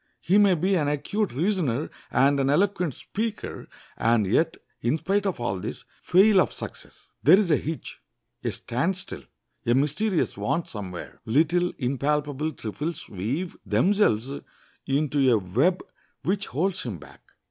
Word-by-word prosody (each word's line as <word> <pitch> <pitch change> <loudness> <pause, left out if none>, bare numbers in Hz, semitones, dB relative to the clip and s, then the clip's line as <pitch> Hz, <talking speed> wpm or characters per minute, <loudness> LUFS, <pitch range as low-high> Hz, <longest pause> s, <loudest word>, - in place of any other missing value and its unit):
He 195 +4 +3
may 200 -3 +5
be 185 +4 +1
an 150 -5 +1
acute 190 +9 -1
reasoner 155 - 0 0.2
and 140 +3 +3
an 135 0 +2
eloquent 180 -1 +1
speaker, 220 +1 -4 0.3
and 115 -2 +2
yet, 160 - +1 0.2
in 120 +6 +1
spite 195 +5 0
of 190 - -2
all 95 -6 -2
this, - - -6 0.2
fail 195 +2 +5
of - - 0
success. - - -10
There 165 +7 +7
is 195 -5 +2
a - - +6
hitch, 155 +2 -5 0.4
a - - 0
stand 165 +11 -1
still, 185 - -6 0.4
a 120 - +2
mysterious 155 +8 +1
want 170 - -1
somewhere. 95 -5 -7
Little, 165 +8 +2
impalpable 145 +3 -1
trifles 150 +9 -5
weave 125 - -3
themselves 180 - +2 0.6
into 140 -1 +2
a 115 - +5
web 125 - +1 0.4
which 200 +2 0
holds 185 +7 0
him 110 -7 -5
back. - - -15
150 Hz, 145 wpm, -26 LUFS, 125-185 Hz, 0.6 s, There